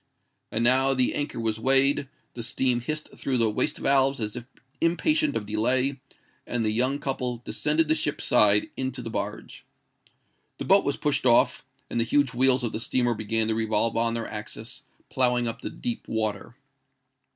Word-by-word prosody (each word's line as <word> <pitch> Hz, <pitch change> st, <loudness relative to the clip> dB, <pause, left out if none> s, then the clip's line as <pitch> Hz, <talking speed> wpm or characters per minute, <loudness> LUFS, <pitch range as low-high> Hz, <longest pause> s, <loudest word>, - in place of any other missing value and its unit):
And 115 Hz, -, -1 dB
now 130 Hz, +2 st, +4 dB
the 130 Hz, -1 st, +2 dB
anchor 145 Hz, -4 st, -3 dB
was 110 Hz, -1 st, -1 dB
weighed; 135 Hz, +2 st, +3 dB, 0.2 s
the 120 Hz, -, -6 dB
steam 120 Hz, +1 st, 0 dB
hissed 155 Hz, +5 st, -5 dB
through 130 Hz, -2 st, -2 dB
the 115 Hz, -2 st, +3 dB
waste 150 Hz, +8 st, 0 dB
valves 135 Hz, 0 st, +2 dB
as 105 Hz, 0 st, -3 dB
if 120 Hz, -1 st, -7 dB, 0.3 s
impatient 305 Hz, -, +1 dB
of 105 Hz, -, -2 dB
delay; 125 Hz, +6 st, 0 dB, 0.5 s
and 120 Hz, -2 st, -1 dB
the 105 Hz, -, +1 dB
young 130 Hz, +5 st, +1 dB
couple 125 Hz, -3 st, -3 dB
descended 155 Hz, +2 st, 0 dB
the 155 Hz, -, +3 dB
ship's 150 Hz, -1 st, -2 dB
side 105 Hz, -3 st, +4 dB
into 130 Hz, -1 st, -4 dB
the 115 Hz, -, -6 dB
barge. -, -, -5 dB, 0.9 s
The -, -, -5 dB
boat -, -, +5 dB
was -, -, -1 dB
pushed -, -, 0 dB
off—and 120 Hz, -, +1 dB
the -, -, +4 dB
huge 140 Hz, +2 st, +1 dB
wheels 130 Hz, +1 st, +3 dB
of 115 Hz, -, -1 dB
the 110 Hz, -, -4 dB
steamer 120 Hz, +1 st, 0 dB
began 110 Hz, 0 st, 0 dB
to -, -, +1 dB
revolve 110 Hz, 0 st, 0 dB
on 115 Hz, 0 st, 0 dB
their 115 Hz, -, -3 dB
axis, 105 Hz, +1 st, -6 dB, 0.3 s
ploughing 125 Hz, -2 st, +1 dB
up 115 Hz, -, -4 dB
the -, -, -4 dB
deep 240 Hz, -3 st, -5 dB
water. 110 Hz, -2 st, -3 dB
125 Hz, 175 wpm, -26 LUFS, 115-135 Hz, 0.9 s, boat